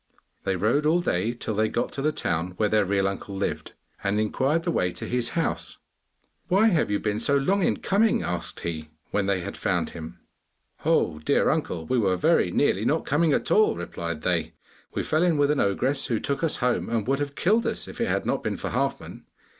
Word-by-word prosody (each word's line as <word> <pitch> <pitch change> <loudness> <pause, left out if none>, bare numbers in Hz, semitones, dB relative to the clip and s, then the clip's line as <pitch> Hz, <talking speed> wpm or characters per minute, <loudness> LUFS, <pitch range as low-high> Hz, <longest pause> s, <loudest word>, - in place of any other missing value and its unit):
They 95 - +1
rode 120 - +2
all 165 +3 +4
day 110 - 0
till 110 - -3
they 110 +1 +1
got 120 - -1
to 135 - -4
the 155 +2 +2
town 85 - -2
where 105 - +2
their 105 -1 +3
real 95 0 +1
uncle 100 0 -5
lived, 95 - -3 0.3
and 100 +1 +1
inquired 135 +9 +1
the 170 - 0
way 90 - +1
to - - -7
his 120 -1 0
house. 165 - -2 0.7
'Why 200 +5 +4
have 170 -6 +1
you 105 - +1
been 105 0 -1
so 140 +5 +3
long 190 +9 +1
in - - +2
coming?' 210 +3 +2
asked 90 -1 -4
he, 80 -2 -4 0.2
when 105 -1 0
they 95 -2 +1
had - - -6
found - - -1
him. 80 -1 -9 0.6
'Oh, 75 - +2
dear 75 - +2
uncle, 80 - -2
we 125 +8 +1
were 95 -4 +2
very - - +3
nearly - - +1
not - - +1
coming 155 +2 +2
at - - 0
all!' 215 - +4
replied 85 -2 -5
they. 85 -3 -1 0.4
'We - - 0
fell 155 - +1
in 175 -3 +3
with 145 0 +3
an 150 - 0
ogress 125 +8 +1
who 115 - 0
took 140 +7 -2
us 165 - +1
home 125 - 0
and 115 -3 0
would 135 +3 +1
have 140 -1 -3
killed 220 +6 +2
us - - -3
if - - -7
it - - +1
had - - 0
not - - -1
been - - -2
for - - -4
Halfman. - - -3
115 Hz, 220 wpm, -25 LUFS, 95-150 Hz, 0.7 s, all